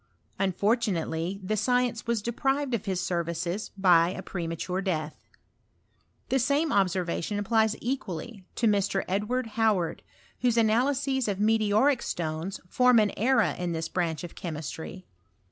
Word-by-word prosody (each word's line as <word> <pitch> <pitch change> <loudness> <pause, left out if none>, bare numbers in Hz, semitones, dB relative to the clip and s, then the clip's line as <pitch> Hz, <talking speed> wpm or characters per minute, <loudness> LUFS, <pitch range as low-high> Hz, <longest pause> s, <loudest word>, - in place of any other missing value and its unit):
Unfortunately 190 -3 0
the 210 +3 -1
science 245 0 0
was 230 -3 0
deprived 270 +3 0
of 225 -2 -1
his 190 -3 -1
services 175 +2 -2
by 175 -3 +5
a 190 +1 -6
premature 175 +1 -3
death. 155 -5 -2 1.1
The 270 - +2
same 285 +5 +1
observa 185 -3 +1
tion 205 +4 -2
applies 220 +1 +2
equally 230 - -4
to 235 - 0
Mr. 200 -2 +2
Edward 210 +7 -1 0.2
Howard, 200 -7 +1 0.4
whose 240 -2 +2
analyses 265 +4 +2
of 200 -2 -1
meteoric 220 +5 +3
stones 165 +3 -3
form 250 +5 +4
an 210 -2 +4
era 260 +5 +3
in 175 -1 -2
this 160 0 -3
branch 170 -2 -1
of 175 - -7
chemistry. 160 +2 -6
200 Hz, 135 wpm, -27 LUFS, 175-235 Hz, 1.1 s, by